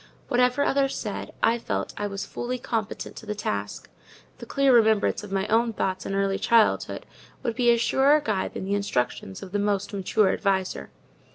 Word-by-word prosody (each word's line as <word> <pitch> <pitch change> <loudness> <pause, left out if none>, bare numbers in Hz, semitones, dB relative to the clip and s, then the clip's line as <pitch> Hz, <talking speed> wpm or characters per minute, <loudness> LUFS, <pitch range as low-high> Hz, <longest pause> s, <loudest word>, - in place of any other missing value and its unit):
Whatever 250 +3 +3
others 275 -1 +1
said, - - -5
I 235 +1 +3
felt - - -3
I 205 - -2
was 200 0 -5
fully 250 +1 -4
competent 230 -4 -4
to 225 - -10
the 210 - -3
task: 105 - -4 0.5
the - - -9
clear 275 -1 +3
remembrance 220 -3 +3
of 205 - -9
my 195 0 0
own 230 +2 +2
thoughts 185 -2 -2
in 195 - -2
early 195 0 0
childhood 230 -2 +2 0.4
would 235 -3 -2
be 245 -2 +3
a 235 - +5
surer 270 +5 +4
guide 215 -9 -2
than - - -4
the 195 - -1
instructions 125 - -2
of 185 - -9
the 205 - 0
most 205 0 -1
mature 200 +1 +2
adviser. 190 - -1
210 Hz, 185 wpm, -25 LUFS, 195-240 Hz, 0.5 s, a